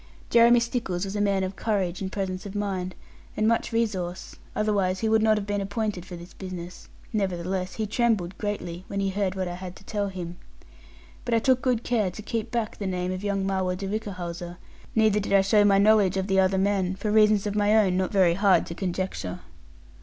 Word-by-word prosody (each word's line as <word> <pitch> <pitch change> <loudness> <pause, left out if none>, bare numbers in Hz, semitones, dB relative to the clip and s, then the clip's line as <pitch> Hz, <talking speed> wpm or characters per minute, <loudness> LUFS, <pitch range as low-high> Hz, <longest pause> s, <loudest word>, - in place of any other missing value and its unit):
Jeremy 235 +1 +7
Stickles 230 -6 -2
was 195 +1 -5
a 205 - 0
man 200 -2 +2
of 190 +1 -3
courage, 190 -5 -1
and 190 -1 -3
presence 190 -2 -3
of 200 - -9
mind, 190 -3 -2 0.4
and 215 - +2
much 230 +1 +1
resource: 195 -6 -2 0.2
otherwise 200 -3 +1
he 225 - +1
would 220 0 +3
not 220 -1 +4
have 205 - -3
been 205 0 -1
appointed 200 -2 -3
for 180 - -7
this 175 +1 -11
business; 180 -2 -8 0.2
nevertheless 185 -2 -2
he 220 - -1
trembled 210 -5 0
greatly 185 -4 -4
when 200 - -3
he 195 0 +1
heard 195 -1 -1
what 190 -1 -2
I 175 - -4
had 180 0 -7
to - - -15
tell 205 0 -2
him. 175 -2 -6 0.9
But 240 -1 0
I - - +5
took 255 +2 +3
good 245 -3 +1
care 220 -6 +1
to 180 +4 -9
keep 225 0 -3
back 230 -3 -2
the 200 - -2
name 180 -1 -2
of 185 +1 -4
young 200 -1 0
Marwood 190 -1 0
de 195 - -5
Whichehalse; 180 -4 -5 0.4
neither 215 -2 +4
did 200 - -2
I 195 - +7
show 205 +2 +4
my 200 -1 +5
knowledge 200 -2 +4
of 190 - 0
the 195 -1 +2
other 190 0 +3
men; 190 -1 +1
for 210 +2 -2
reasons 215 -1 +4
of 205 - -1
my 210 +1 +3
own 195 -4 +3
not 185 0 0
very 185 -4 +4
hard 195 +1 +3
to - - -6
conjecture. 175 - -3
195 Hz, 215 wpm, -26 LUFS, 185-215 Hz, 0.9 s, Jeremy